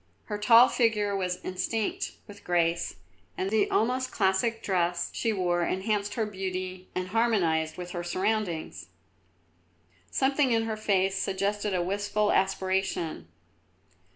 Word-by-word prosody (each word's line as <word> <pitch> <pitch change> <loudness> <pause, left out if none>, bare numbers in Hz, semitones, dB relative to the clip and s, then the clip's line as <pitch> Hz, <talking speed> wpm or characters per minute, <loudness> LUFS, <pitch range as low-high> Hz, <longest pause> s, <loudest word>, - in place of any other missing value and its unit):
Her 210 -1 -4
tall 230 +4 +7
figure 210 -5 +1
was 180 -2 -2
instinct 205 +4 -2
with 205 0 -13
grace, 170 -1 0 0.4
and 190 +1 -2
the 220 -1 +2
almost 255 +3 +1
classic 205 +3 +1
dress 175 -2 0
she 230 - 0
wore 175 -4 0
enhanced 205 +3 -1
her 225 - 0
beauty 185 -2 -5
and 185 0 -2
harmonised 180 -8 +1
with 180 -1 -6
her 175 -1 -4
surroundings. 185 -1 -2 1.2
Something 270 -1 +2
in 225 0 +2
her 225 -1 -2
face 195 -2 +1
suggested 200 +1 -1
a 175 - +1
wistful 205 +3 0
aspiration. 190 -3 0
195 Hz, 125 wpm, -28 LUFS, 185-215 Hz, 1.2 s, tall